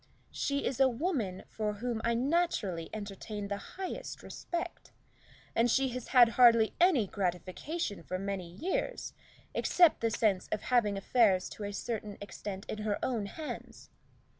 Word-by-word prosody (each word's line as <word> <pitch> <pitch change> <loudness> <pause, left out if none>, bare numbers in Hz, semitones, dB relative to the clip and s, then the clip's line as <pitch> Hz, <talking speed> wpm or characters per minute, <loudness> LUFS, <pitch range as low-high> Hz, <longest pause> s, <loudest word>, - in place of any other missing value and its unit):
"She 280 0 -1
is 260 - -1
a 265 -1 +6
woman 240 - -2
for 210 -1 -2
whom 230 +1 -3
I 235 0 +2
naturally 240 - 0
entertain 205 0 -5
the 200 - -1
highest 380 - -6
respect, 345 +1 -5 0.7
and 235 +1 +4
she 265 +3 +3
has 250 0 -5
had 245 -3 +7
hardly 230 -2 +6
any 340 - +5
gratification 195 - -3
for 185 +3 -4
many 195 -2 -4
years, 380 - -3 0.4
except 350 -3 +4
the 230 - +2
sense 210 -4 +1
of 215 - -2
having 220 -5 +2
affairs 195 -2 +3
to 210 - -6
a 200 - -3
certain 210 -1 -4
extent 205 0 -6
in 215 - -4
her 210 -1 0
own 230 -6 -1
hands. 305 +8 -8
220 Hz, 150 wpm, -31 LUFS, 200-265 Hz, 0.7 s, had